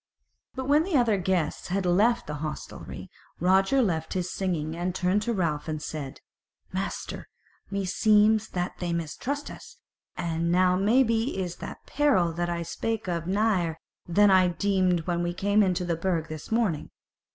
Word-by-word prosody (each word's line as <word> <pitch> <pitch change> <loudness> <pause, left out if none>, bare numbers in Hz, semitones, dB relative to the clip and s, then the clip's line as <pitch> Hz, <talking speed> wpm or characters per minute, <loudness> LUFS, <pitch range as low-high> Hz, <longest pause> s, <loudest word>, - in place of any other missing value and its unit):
But 260 -1 -4
when 290 +2 +5
the 330 -2 +1
other 230 -5 +3
guests 180 -4 -1
had 190 +1 -1
left 210 +7 +3
the 150 0 -5
hostelry, 155 -1 -7 0.3
Roger 195 +9 +3
left 160 -6 -1
his 185 0 -2
singing, 165 -5 -2
and 175 +1 -2
turned 185 +3 +1
to 235 +3 -1
Ralph 165 -7 -1
and 155 -1 -2
said: 150 -3 -6 0.5
"Master, - - -4 0.4
meseems 210 +2 +3
that 180 0 -3
they 175 -1 -2
mistrust 245 - -3
us, - - -12 0.4
and 170 -1 -1
now 180 0 +4
maybe 225 +4 +2
is 180 -2 -3
that - - -8
peril 265 - +2
that 175 +1 -2
I 170 0 -2
spake 225 +5 -3
of 170 -2 -2
nigher 190 -5 +1 0.3
than 200 +4 +5
I 185 -1 +6
deemed 185 -1 +1
when 175 +1 -1
we 175 0 -2
came 205 +3 +2
into 180 -2 +1
the 170 -1 0
Burg 165 -2 -1
this 155 +4 -8
morning. 220 -9 0
185 Hz, 165 wpm, -27 LUFS, 170-210 Hz, 0.5 s, I